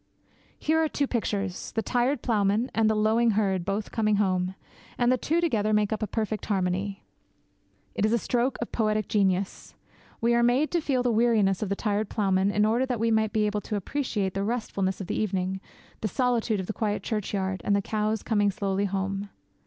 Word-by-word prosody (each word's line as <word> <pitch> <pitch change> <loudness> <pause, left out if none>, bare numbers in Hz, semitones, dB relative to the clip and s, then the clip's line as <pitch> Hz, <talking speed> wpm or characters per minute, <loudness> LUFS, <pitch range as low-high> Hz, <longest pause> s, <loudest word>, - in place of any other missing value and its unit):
Here 320 +1 +2
are 315 - 0
two 285 - 0
pictures 205 -7 -2
the 225 - -1
tired 250 +3 0
ploughman 215 +1 +1
and 225 -1 +3
the 220 - +2
lowing 220 +2 +3
herd 190 -4 +1
both 200 +3 -3
coming 215 -2 +2
home; 185 -2 0 0.4
and 245 0 +3
the - - +5
two 325 +6 0
together 220 -11 +1
make 210 0 +2
up 215 - -4
a 215 - -1
perfect 215 0 -3
harmony. 195 0 -1 0.9
It - - -2
is 215 - +3
a 235 - +4
stroke 245 +3 0
of - - -9
poetic 215 -2 0
genius. 195 -2 0 0.4
We 235 +1 +2
are 235 - +3
made 245 +6 +3
to 345 - +1
feel 265 -4 0
the 245 - +2
weariness 215 -4 +3
of 210 - -2
the 200 - 0
tired 210 0 -1
ploughman 195 -2 +1
in 210 +1 +2
order 235 +4 +2
that 245 -3 -2
we 230 +1 +1
may 220 0 +3
be 215 0 0
able 210 0 -1
to 210 - -4
appreciate 205 -3 -2
the 195 - -2
restfulness 200 -4 -2
of - - -4
the - - -2
evening, 190 -2 -1 0.4
the 215 - -1
solitude 235 -2 0
of 190 - -3
the 215 - -4
quiet 210 -1 -2
churchyard, 195 -3 -2
and 200 - +2
the 200 - +2
cows 215 +1 -1
coming 205 -2 +2
slowly 195 0 -1
home. 195 +1 -2
215 Hz, 205 wpm, -27 LUFS, 195-235 Hz, 0.9 s, the